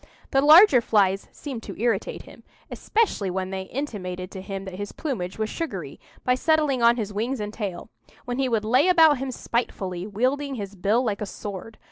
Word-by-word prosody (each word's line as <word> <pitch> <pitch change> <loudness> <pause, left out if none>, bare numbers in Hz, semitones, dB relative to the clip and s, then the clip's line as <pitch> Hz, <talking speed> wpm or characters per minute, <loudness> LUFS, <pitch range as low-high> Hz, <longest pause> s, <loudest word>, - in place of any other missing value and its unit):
The 270 - +3
larger 305 - +8
flies 195 -4 +1
seemed 265 -6 -7
to - - -9
irritate 225 -3 -1
him, - - -15 0.3
especially 415 - 0
when 185 +1 -3
they 190 0 -4
intimated 185 -9 -5
to 190 - -7
him 195 0 -6
that 190 - -7
his 205 +2 -6
plumage 205 - -4
was 220 0 -1
sugary, 195 - -5 0.2
by 250 - +3
settling 295 -1 +2
on 235 0 +6
his 210 -3 -3
wings 235 +6 -2
and 210 0 -4
tail; 200 -2 -5 0.3
when 245 +1 -3
he 265 -1 +1
would 220 -3 0
lay 255 +9 +4
about 320 -6 +6
him 270 0 -3
spitefully, 195 -7 -3
wielding 265 +7 -1
his 200 -4 -6
bill 205 +6 +1
like 210 -4 -2
a 210 - -3
sword. 205 +2 -8
220 Hz, 190 wpm, -24 LUFS, 195-265 Hz, 0.3 s, larger